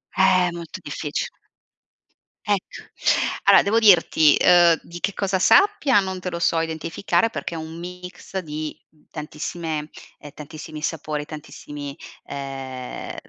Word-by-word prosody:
Eh 185 -1 +4
molto 170 -1 -8
diffic - - -4 1.1
Ecco, 205 -3 -2 0.6
allora - - +7
devo 210 +3 +1
dirti, 175 -8 +6
ehm, 175 -2 +6
di 175 +1 -10
che 200 +3 -1
cosa 195 -1 0
sappia 300 - +5
non 190 -1 -3
te 180 0 -4
lo 170 - -4
so 170 -1 +2
identificare, 165 +7 0
perché 185 - -5
è - - -4
un 160 +1 -8
mix 180 +2 -7
di 155 -3 -5 0.4
tantissime 155 0 -5 0.3
ehm, 145 - -12
tantissimi 155 +1 -9
sapori, 150 -2 -3
tantissimi, 145 -2 -8 0.3
ehm, 135 -2 -6
165 Hz, 125 wpm, -23 LUFS, 150-185 Hz, 1.1 s, allora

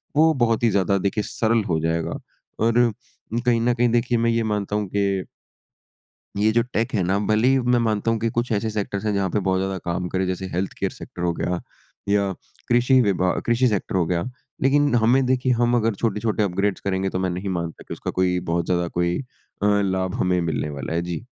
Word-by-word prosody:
वो 160 +2 +5
बहुत 120 -4 +1
ही 115 - +5
ज़्यादा 100 -1 +2
देखिए 100 +2 -1
सरल 115 +1 +1
हो 80 -3 +1
जाएगा। 80 +1 -1 0.4
और 115 +1 +3 0.5
कहीं 120 -2 +3
न 120 +1 +2
कहीं 120 0 +2
देखिए 120 +1 +2
मैं 115 0 +2
ये 115 0 +1
मानता 105 -2 -2
हूँ 105 -1 -1
कि 100 -2 +1 1.1
ये 105 +2 +3
जो 120 +2 +3
टेक 110 +2 0
है 100 -5 +1
ना, 95 +3 +1
भले 110 +3 +2
ही 135 0 +4
मैं 125 -1 +2
मानता 110 -1 +1
हूँ 115 - 0
कि 115 - 0
कुछ 120 +2 -2
ऐसे 110 +1 0
सेक्टर्स 105 -1 -3
हैं, 105 - +1
जहाँ 100 -1 0
पे 105 - 0
बहुत 95 -1 0
ज़्यादा 95 0 -2
काम 90 +1 -2
करे, 95 +1 0
जैसे 95 +1 -3
हेल्थ 90 +2 -2
केयर - - -1
सेक्टर 90 - -10
हो 85 - +2
गया 90 +1 -2 0.5
या 100 -1 +2 0.4
कृषि 125 +2 +4
विभा 95 -4 +2
कृषि 120 +2 +3
सेक्टर 105 -4 -1
हो 90 -2 +2
गया। 85 0 0 0.4
लेकिन 145 +1 +3
हमें 120 +3 +4
देखिए, 130 0 +1
हम 120 0 +2
अगर 115 -2 +1
छोटे-छोटे 110 0 0
अपग्रेड्स 100 +1 -1
करेंगे, 95 0 -1
तो 95 - -3
मैं 95 0 0
नहीं 90 +3 -3
मानता 85 -3 -4
कि - - -5
उसका - - -5
कोई 90 -1 +1
बहुत 85 0 0
ज़्यादा 90 -1 0
कोई 85 0 0 0.5
अ, - - +3 0.2
लाभ 95 -1 -1
हमें 90 -1 +2
मिलने 80 -2 -2
वाला 70 +1 -5
है। 85 - 0
जी। 85 +5 -5
100 Hz, 215 wpm, -23 LUFS, 90-115 Hz, 1.1 s, वो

